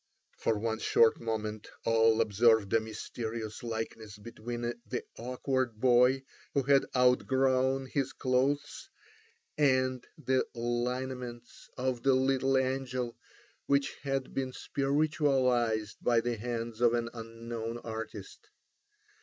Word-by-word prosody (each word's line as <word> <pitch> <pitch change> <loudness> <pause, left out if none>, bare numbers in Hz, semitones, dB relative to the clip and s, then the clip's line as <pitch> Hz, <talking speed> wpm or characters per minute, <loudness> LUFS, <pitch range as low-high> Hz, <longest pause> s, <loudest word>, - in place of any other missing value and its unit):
For 110 - 0
one 110 +1 -2
short 115 0 +4
moment 110 -2 -3 0.2
all 115 0 +4
observed 110 -1 +3
a 115 - +6
mysterious 110 0 -5
likeness 110 -2 -5
between 115 +2 -6
the 120 +1 -4
awkward 125 -1 -2
boy 125 +2 +4 0.3
who 140 - +3
had 140 +1 +4
outgrown 130 +1 +3
his 135 0 -1
clothes, 140 - -1 0.7
and 130 -3 +2
the 130 -3 +1
lineaments 120 0 -4
of 125 -1 -1
the 135 0 +4
little 135 0 +2
angel, 130 -2 -1 0.5
which 140 0 +2
had 135 -2 -2
been 130 -1 -2
spiritualised 135 -7 +1
by 120 -1 +3
the 120 +1 -1
hand 115 0 -4
of 120 -1 +5
an 115 0 -2
unknown 115 0 -6
artist. 115 - -8
120 Hz, 110 wpm, -31 LUFS, 115-130 Hz, 0.7 s, a